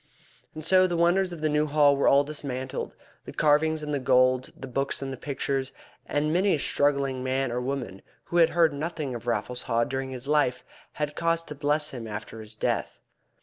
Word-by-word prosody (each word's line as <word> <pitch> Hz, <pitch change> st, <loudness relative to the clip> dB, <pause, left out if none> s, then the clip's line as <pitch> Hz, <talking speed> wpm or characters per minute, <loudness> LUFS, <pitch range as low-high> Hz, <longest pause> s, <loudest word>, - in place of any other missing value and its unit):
And 155 Hz, -1 st, -6 dB
so 185 Hz, +1 st, +5 dB
the 175 Hz, -1 st, -2 dB
wonders 180 Hz, +2 st, +3 dB
of 170 Hz, -3 st, -7 dB
the 155 Hz, -, +2 dB
New 150 Hz, +1 st, +1 dB
Hall 145 Hz, -1 st, +4 dB
were 140 Hz, -, +1 dB
all 140 Hz, +1 st, +6 dB
dismantled, 135 Hz, -3 st, -5 dB, 0.3 s
the -, -, -7 dB
carvings 155 Hz, +1 st, +2 dB
and 150 Hz, 0 st, -3 dB
the 140 Hz, -, 0 dB
gold, 130 Hz, 0 st, +3 dB
the -, -, -7 dB
books 135 Hz, +2 st, -2 dB
and 135 Hz, 0 st, -4 dB
the -, -, -4 dB
pictures, 135 Hz, 0 st, -3 dB, 0.4 s
and 150 Hz, +1 st, 0 dB
many 190 Hz, +2 st, +3 dB
a -, -, -1 dB
struggling 140 Hz, -2 st, 0 dB
man 130 Hz, 0 st, 0 dB
or 125 Hz, +1 st, -2 dB
woman 125 Hz, -7 st, -4 dB, 0.2 s
who 175 Hz, -, -3 dB
had 165 Hz, -1 st, +6 dB
heard 165 Hz, -3 st, +3 dB
nothing 150 Hz, -2 st, -4 dB
of 120 Hz, 0 st, -7 dB
Raffles 120 Hz, +3 st, -2 dB
Haw 115 Hz, +1 st, +1 dB
during 135 Hz, +2 st, -3 dB
his 130 Hz, 0 st, -8 dB
life 130 Hz, -4 st, +1 dB, 0.3 s
had 150 Hz, -1 st, -3 dB
cause 165 Hz, 0 st, 0 dB
to 150 Hz, -, -8 dB
bless 150 Hz, +1 st, 0 dB
him 120 Hz, -4 st, -7 dB
after 110 Hz, +1 st, -7 dB
his 110 Hz, 0 st, -5 dB
death. -, -, -2 dB
140 Hz, 205 wpm, -27 LUFS, 130-155 Hz, 0.4 s, all